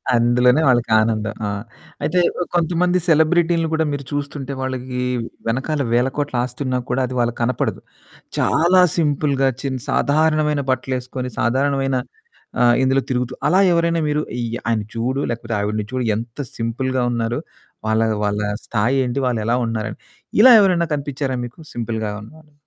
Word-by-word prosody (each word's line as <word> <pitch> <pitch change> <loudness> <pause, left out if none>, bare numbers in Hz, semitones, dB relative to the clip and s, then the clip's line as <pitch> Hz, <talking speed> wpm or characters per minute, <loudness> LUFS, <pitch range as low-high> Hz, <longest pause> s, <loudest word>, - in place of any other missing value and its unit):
అందులోనే 125 +4 +4
వాళ్ళకానందం. 110 -3 +2
ఆ! - - -1 0.6
అయితే 155 +5 +1 0.2
ఓ - - -1
కొంతమంది 175 +1 +2
సెలబ్రిటీలని 165 +1 +3
కూడా 160 0 +2
మీరు 145 -1 -3
చూస్తుంటే 140 -1 -4
వాళ్ళకి 130 -1 -4 0.5
వెనకాల 135 +6 -1
వేల 120 +2 +3
కోట్ల 145 -3 -2
ఆస్తి 125 +2 -7
ఉన్నా 130 -1 0
కూడా 125 +2 +1
అది 130 - -6
వాళ్ళకి 120 0 0
కనపడదు. 125 +2 -1 0.6
చాలా 175 +3 +4 0.2
సింపుల్‌గా 145 -4 +1
చి 140 - -2 0.2
సాధారణమైన 150 0 +2
బట్టలేసుకొని 130 0 -3
సాధారణమైన 135 +2 +1 0.6
ఆహ్, 120 -1 +5
ఇందులో 135 +1 +3
తిరుగుతూ 125 -1 -1
అలా 185 - +4
ఎవరైనా 170 0 +2
మీరు 150 0 +1 0.2
అయ్ 120 -1 -2 0.2
ఆయన 115 -2 +1
చూడు 125 +4 -1
లేకపోతే 115 0 -4
ఆవిడని 105 +1 -1
చూడు 130 -1 -2
ఎంత 115 +4 -7 0.2
సింపుల్‌గా 125 +3 -1
ఉన్నారో, 115 0 -1 0.5
వాళ్ళ 110 0 +2 0.2
వాళ్ళ 105 0 0 0.3
స్థాయేంటి 125 +3 0
వాళ్ళెలా 115 -1 0
ఉన్నారని. 110 -2 -3 0.4
ఇలా 250 +3 +9
ఎవరైనా 180 -4 +2
కనిపించారా 140 -2 -3
మీకు 120 - -9 0.2
సింపుల్‌గా 110 -2 -3
ఉన్న 105 - -12
వాళ్ళు. 150 -1 -21
130 Hz, 140 wpm, -20 LUFS, 120-150 Hz, 0.6 s, ఇలా